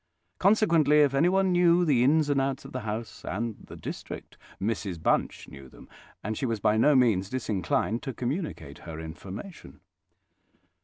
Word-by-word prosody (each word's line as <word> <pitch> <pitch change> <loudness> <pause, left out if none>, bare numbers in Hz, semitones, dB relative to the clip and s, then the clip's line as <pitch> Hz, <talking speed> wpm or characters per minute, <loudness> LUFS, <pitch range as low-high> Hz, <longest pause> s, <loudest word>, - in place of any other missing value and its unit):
Consequently, 165 -8 +4
if 140 -2 +3
anyone 185 +6 +3
knew 175 0 +4
the 130 -6 +3
ins 150 +3 +3
and 140 -2 +2
outs 135 0 -2
of 135 - -10
the 130 - -4
house 110 0 -6
and 110 +3 -3
the - - -10
district, - - -8 0.2
Mrs 100 -4 -3
Bunch - - 0
knew 70 -2 -12
them; - - -15 0.4
and 110 +2 -3
she 130 - -2
was 115 -2 -2
by 105 +2 +2
no 145 +7 +4
means 110 -7 +3
disinclined 110 -1 -1
to 135 - -4
communicate 125 - -4
her 80 -2 -8
information. 95 - -9
125 Hz, 160 wpm, -27 LUFS, 105-150 Hz, 0.4 s, Consequently